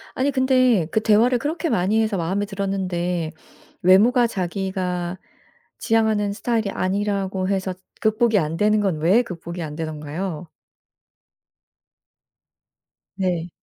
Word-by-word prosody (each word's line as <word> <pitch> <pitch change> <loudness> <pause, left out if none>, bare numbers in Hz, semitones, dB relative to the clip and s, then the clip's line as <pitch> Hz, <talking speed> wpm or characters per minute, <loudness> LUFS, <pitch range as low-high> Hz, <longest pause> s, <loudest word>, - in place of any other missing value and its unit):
아니 275 +2 +1
근데 255 - +3
그 220 - +1
대화를 230 +4 +4
그렇게 320 +3 -2
많이 215 +1 +2
해서 215 -3 0
마음에 190 +5 -1
들었는데 180 -4 -2 0.5
외모가 230 +7 +5
자기가 185 -2 -3 0.6
지향하는 220 -3 +1
스타일이 225 -1 -1
아니라고 195 -1 -1
해서 190 -1 -1 0.3
극복이 220 0 +2
안 160 +1 -2
되는 210 0 +3
건 190 -6 0
왜 190 +10 +4
극복이 170 -3 -7
안 150 -1 -6
되던가요? 160 +2 -5 2.7
네. 180 -3 -1
195 Hz, 260 characters per minute, -22 LUFS, 180-220 Hz, 2.7 s, 외모가